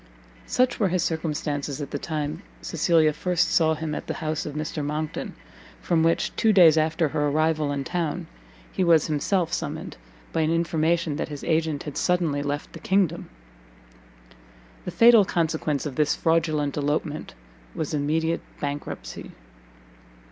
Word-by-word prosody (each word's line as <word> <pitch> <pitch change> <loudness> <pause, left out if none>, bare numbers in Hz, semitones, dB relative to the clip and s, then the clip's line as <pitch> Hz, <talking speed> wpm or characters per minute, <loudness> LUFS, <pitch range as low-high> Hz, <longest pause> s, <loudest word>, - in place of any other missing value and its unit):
Such 255 0 +1
were 205 - +3
his 185 0 0
circumstances 150 -3 -2
at 145 - -6
the 145 - -3
time 150 -1 -3 0.2
Cecilia 160 -3 +2
first 175 +2 0
saw 160 -1 +3
him 155 0 -4
at - - -5
the - - -3
house 155 -1 -3
of 150 - -6
Mr. 155 0 -3
Monckton: 150 +1 -4 0.4
from 170 -2 +1
which, 165 +1 +1
two 220 - +3
days 175 -6 +7
after 155 0 +1
her 150 +1 0
arrival 155 0 +1
in 140 -1 -2
town, 170 -1 -2 0.5
he 190 - 0
was 165 -3 +5
himself 165 +3 0
summoned, - - -4 0.4
by 160 - +1
an 155 - +1
information 165 -1 +1
that - - -3
his 145 -2 -7
agent 160 -3 0
had 150 - -6
suddenly 170 -5 +1
left 145 +1 -4
the - - -9
kingdom. 190 -4 0 1.6
The - - -3
fatal 230 -2 +7
consequence 160 -5 -1
of 140 -4 -5
this 150 -1 +2
fraudulent 155 -4 +1
elopement 150 +1 -2 0.4
was 155 -1 -3
immediate 160 +3 0 0.2
bankruptcy. 145 0 -6
155 Hz, 150 wpm, -25 LUFS, 150-170 Hz, 1.6 s, days